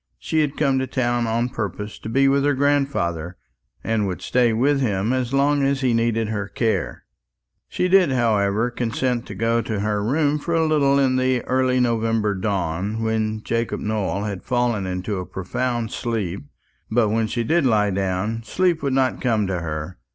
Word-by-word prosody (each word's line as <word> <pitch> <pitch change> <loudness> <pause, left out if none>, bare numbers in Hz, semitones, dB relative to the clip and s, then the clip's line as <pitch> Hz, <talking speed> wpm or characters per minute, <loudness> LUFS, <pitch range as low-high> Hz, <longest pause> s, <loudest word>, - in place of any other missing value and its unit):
She 160 - -1
had 150 -2 0
come 135 -3 +2
to 130 - -2
town 120 -2 0
on 115 +2 0
purpose 105 -2 -5
to - - -7
be 135 +4 +3
with 140 0 +3
her 145 -1 +2
grandfather, 130 - 0 0.5
and 110 -2 0
would 90 - -5
stay 125 -2 +2
with 135 +5 +2
him 105 -1 0
as 130 -2 -1
long 140 +1 +2
as 140 0 +1
he 125 -3 +2
needed 115 -1 +1
her 105 -2 -3
care. 110 +1 -2 0.7
She 180 - 0
did, 185 -4 +4
however, 110 -2 +1
consent 120 0 -2
to - - -7
go 115 +1 +1
to 110 -2 -3
her 105 0 -1
room 145 +5 +1
for 170 +3 -2
a 165 -1 +3
little 140 -3 +3
in 130 -2 +2
the 130 -1 +1
early 130 0 +1
November 115 -3 +1
dawn, 100 +2 -2
when 110 -1 -1
Jacob 115 +1 -1
Nowell 105 -2 -2
had 100 -3 -4
fallen 120 -6 0
into 95 +2 -3
a 90 - -5
profound 120 +4 -3
sleep; 100 -9 -3 0.4
but 110 -1 +2
when 110 +1 +1
she 115 +2 -2
did 160 +6 +2
lie 105 -3 +2
down, 95 +4 -1
sleep 175 +7 +1
would 140 -2 -1
not 130 -1 +1
come 110 -5 +1
to 95 -2 -2
her. 80 +1 -5
115 Hz, 185 wpm, -22 LUFS, 105-130 Hz, 0.7 s, did